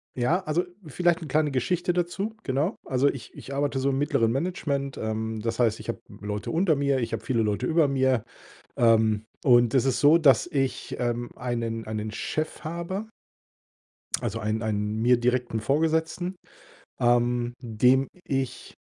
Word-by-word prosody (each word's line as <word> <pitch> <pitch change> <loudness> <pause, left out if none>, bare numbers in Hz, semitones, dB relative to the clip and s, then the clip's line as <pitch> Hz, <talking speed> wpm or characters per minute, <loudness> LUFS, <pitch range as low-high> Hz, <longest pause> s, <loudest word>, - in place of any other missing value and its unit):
Ja, 130 +9 +2
also, 160 +3 +1 0.2
vielleicht 175 +4 +1
'ne 160 - -6
kleine 150 +1 +1
Geschichte 175 +7 0
dazu, 180 +5 -2
genau. 145 - 0
Also, 130 +1 +2
ich 135 -4 -4
ich 140 - -8
arbeite 140 0 0
so 135 +1 +1
im 135 - -1
mittleren 140 -6 +2
Management, 140 -2 -2
ähm, 110 0 -3
das 115 +2 -3
heißt, 115 -3 +2
ich - - -9
habe - - -3
Leute 105 +1 -5
unter 165 -1 +3
mir, 140 -1 +1
ich 115 -1 -3
habe 115 - -3
viele 125 -4 +1
Leute 105 -1 -1
über 160 -2 +3
mir. 130 -4 +2 0.5
Ähm, 110 -2 +3 0.2
und 120 -3 +5
es 130 - +4
ist 130 - +1
so, 150 +3 +7
dass 140 -6 +5
ich, 135 -6 -2
ähm, 120 -1 -2
einen 115 -2 -3
einen 110 0 -3
Chef 155 +9 -3
habe 170 +6 -4 1.1
also, 115 - -2
einen 110 +1 -1
einen 105 0 -1
mir 125 +1 +5
direkten 125 -1 0
Vorgesetzten, 160 - 0 0.7
ähm, 120 0 +2
dem 125 +3 +3 0.2
ich 135 -2 -3
130 Hz, 160 wpm, -26 LUFS, 115-155 Hz, 1.1 s, so